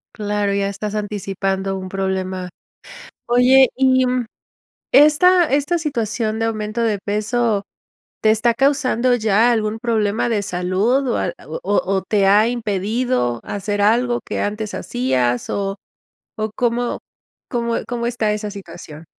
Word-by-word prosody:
Claro, 205 -2 -1
ya 200 0 0
estás 205 +1 -5
anticipando 195 -2 -2
un 185 0 -6
problema. 190 -1 -3 0.8
Oye, 250 +2 +5
y 260 0 +3 0.9
esta 345 +5 +6
esta 290 +5 +1
situación 225 -7 -2
de 225 - 0
aumento 215 +1 -2
de 215 -3 +1
peso, 210 +1 -1 0.6
¿te 215 - +3
está 220 +2 +3
causando 255 -1 +2
ya 220 0 +3
algún 220 -1 0
problema 220 -1 0
de 210 -3 0
salud 195 +8 0
o 240 - 0
ha - - -1
o - - -6
o 195 -1 0
te 200 0 +1
ha 210 +3 +5
impedido 220 - -1
hacer 205 0 -3
algo 240 +4 +2
que - - -3
antes 210 +1 -3
hacías 125 -1 -1
o 195 0 -2 0.6
o 215 -1 -2
cómo 240 0 -1 0.5
cómo 235 -1 -1
cómo 235 -1 -2
está 225 -3 0
esa 210 0 -4
situación? 170 -5 -10
215 Hz, 135 wpm, -20 LUFS, 195-240 Hz, 0.9 s, esta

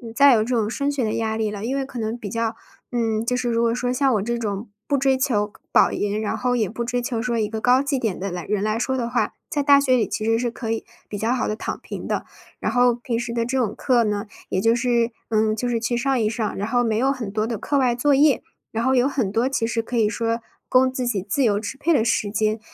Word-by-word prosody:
再 280 +1 +7
有 220 -2 +3
这 245 +3 -1
种 215 -2 +1
升 280 +5 -1
学 280 -3 -1
的 215 - 0
压 220 -1 -1
力 220 -1 0
了， 205 0 -5
因 260 +3 -1
为 275 - 0
可 265 -2 -9
能 220 0 -2
比 220 -4 -7
较 230 +1 -1 0.4
嗯， 225 -2 0
就 250 - +1
是 250 -1 -1
如 230 0 +1
果 230 0 +2
说 245 +1 -1
像 265 +1 +2
我 205 - +1
这 235 +4 -1
种 210 -1 -4 0.2
不 285 - +2
追 270 -1 +2
求 210 -6 0 0.2
保 - - +5
研， 205 +1 -1
然 220 +1 -2
后 245 +2 0
也 220 -5 0
不 235 +2 -4
追 245 +1 -1
求 240 -1 -2
说 235 0 -1
一 215 - +1
个 220 +1 -4
高 250 +3 +4
绩 280 0 0
点 225 -7 -2
的 195 +2 -3
来 175 -1 -5
人 210 -1 -1
来 215 +1 0
说 265 +3 -1
的 240 -2 -2
话， 245 - 0 0.2
在 290 - 0
大 280 0 +7
学 265 -2 +3
里 230 - +1
其 - - -3
实 225 +1 +2
是 240 0 -1
可 230 -1 -6
以 225 0 -2 0.2
比 205 - -4
较 225 +4 0
好 255 - 0
地 215 - -1
躺 - - -4
平 - - -7
的。 - - -2 0.3
然 - - -1
后 245 0 +4
平 240 0 -3
时 235 0 -4
的 235 -1 0
这 250 +3 -1
种 225 -5 0
课 245 -2 +2
呢， 210 0 -2 0.2
也 185 - 0
就 225 +2 +4
是 235 -1 +1 0.2
嗯， 215 -1 +2
就 245 +3 -2
是 235 -1 0
去 240 +1 -1
上 265 +1 +1
一 215 - +2
上。 220 -2 -2
然 205 - -2
后 245 +1 +2
没 225 -2 0
有 260 +5 +2
很 240 -7 -4
多 215 +1 -1
的 230 -1 -2
课 285 - -1
外 250 -3 +2
作 285 +4 +2
业， 280 -2 +4 0.3
然 225 +1 -2
后 260 +1 +3
有 250 +1 +4
很 255 -8 -1
多 230 +4 +1
其 255 -4 0
实 230 0 0
可 235 +2 -4
以 220 -2 +4
说 230 +1 -1 0.3
供 255 0 +4
自 255 -1 -3
己 210 -5 0
自 265 +7 +1
由 205 -4 +3
支 220 +5 -6
配 330 +4 +2
的 235 - +3
时 225 -3 +1
间。 215 +1 0
235 Hz, 305 characters per minute, -23 LUFS, 220-250 Hz, 0.4 s, 再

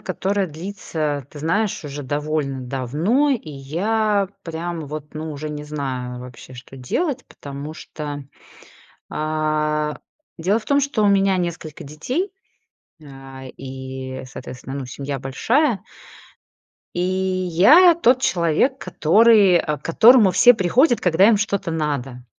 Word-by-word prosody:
которая 195 0 -1
длится, 155 -4 -4
ты 150 - -11
знаешь, 175 +6 -1
уже 145 0 -6
довольно 145 -1 -2
давно, 150 - 0
и 230 - -2
я 200 +9 0 0.2
прям 165 -1 -5
вот, 150 0 -8
ну, 155 +1 -5
уже 150 +1 -6
не 150 0 -6
знаю 130 -4 -5
вообще, 125 +1 -11
что 125 +1 -12
делать, 260 - -2
потому 140 +2 -8
что, 145 -3 -7 0.9
а, 155 -1 -1 0.4
дело 190 +6 +1
в 215 - -16
том, 280 0 +3
что 275 -6 0
у - - +4
меня 195 -1 +3
несколько 170 -4 -4
детей, 250 - -3 0.7
а, 135 -1 -11 0.2
и, 130 0 -7
соответственно, 130 0 -9
ну, 135 - -5
семья 140 +2 -5
большая. 225 - +1 1.1
И 175 - -1
я 185 - +4
тот 260 -6 +3
человек, 175 - +1
который, 205 - +4
э, 150 -3 0
к 145 - -19
которому 220 +4 +6
все 245 +6 +6
приходят, 235 - +3
когда 180 +3 +4
им 230 - +5
что-то 200 -3 -1
надо. 140 -6 -3
160 Hz, 130 wpm, -21 LUFS, 140-200 Hz, 1.1 s, которому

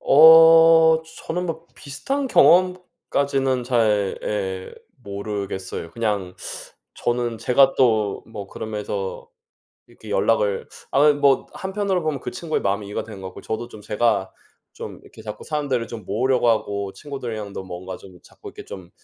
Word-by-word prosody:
어 160 +1 +7 0.2
저는 180 +2 -2
뭐 165 0 -5
비슷한 270 - -4
경험까지는 140 - +2
잘 110 -5 +1
예, 95 -3 -3 0.3
모르겠어요. 100 -3 -5
그냥 105 -4 -2 0.6
저는 120 -1 -2
제가 130 +4 +4
또 110 -5 +2
뭐 105 -3 -8
그러면서 105 -3 -5 0.6
이렇게 110 - -14
연락을 100 0 +1 0.2
아이 150 +2 +5
뭐 140 -2 +2
한편으로 195 -1 -2
보면 155 -4 -2
그 - - -5
친구의 170 -4 -3
마음이 100 +1 -1
이해가 100 - -4
된 105 -3 -10
것 95 - -6
같고 - - -11
저도 110 +2 -4
좀 110 - -12
제가 105 -2 0 0.4
좀 - - -8
이렇게 110 - -15
자꾸 105 -1 -8
사람들을 140 -6 -2
좀 115 -2 -8
모으려고 125 +4 +1
하고 100 -3 0
친구들이랑도 115 -9 -6
뭔가 95 0 -7
좀 90 -2 -15
자꾸 - - -13
이렇게 - - -11
좀 90 -3 -10
115 Hz, 305 characters per minute, -22 LUFS, 100-145 Hz, 0.6 s, 어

